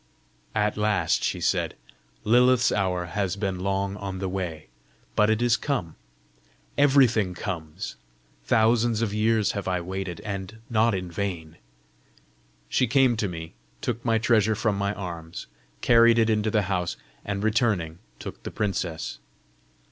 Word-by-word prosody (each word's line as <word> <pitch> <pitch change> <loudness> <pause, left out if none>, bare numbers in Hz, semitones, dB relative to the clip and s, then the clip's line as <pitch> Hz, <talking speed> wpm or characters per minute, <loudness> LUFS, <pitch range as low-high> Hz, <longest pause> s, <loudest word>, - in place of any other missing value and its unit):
"At 105 -1 +1
last!" 105 -1 +1
she - - 0
said. - - 0 0.5
"Lilith's 125 +2 +4
hour 90 -3 0
has 95 +1 -2
been 95 -2 -2
long 100 +1 -1
on 95 -2 -5
the 95 0 -3
way, 90 -5 -4 0.5
but 105 0 +4
it 110 +2 +2
is 120 -1 +4
come! 110 - -2 0.8
Everything 125 -9 +4
comes. 85 -5 -5 0.5
Thousands 115 - +3
of 105 -3 -1
years 110 -1 +2
have 100 -2 -4
I 90 -1 +1
waited 95 +1 -5
and 100 0 -5
not 115 -1 +3
in 90 -2 -4
vain!" 85 -4 -4 1.1
She 125 - +2
came 130 -1 +4
to 105 -2 0
me, 80 -2 -7 0.3
took 120 -1 -3
my 115 -2 +2
treasure 110 -1 +3
from 105 -1 0
my 100 +1 -1
arms, 85 -4 -6 0.4
carried 115 0 +6
it 115 -1 +4
into 110 0 +1
the 110 -1 +2
house, 90 -2 -2 0.3
and 100 0 -3
returning, 105 -7 +1 0.2
took - - -8
the - - -6
princess. 90 -6 -3
105 Hz, 145 wpm, -26 LUFS, 90-115 Hz, 1.1 s, carried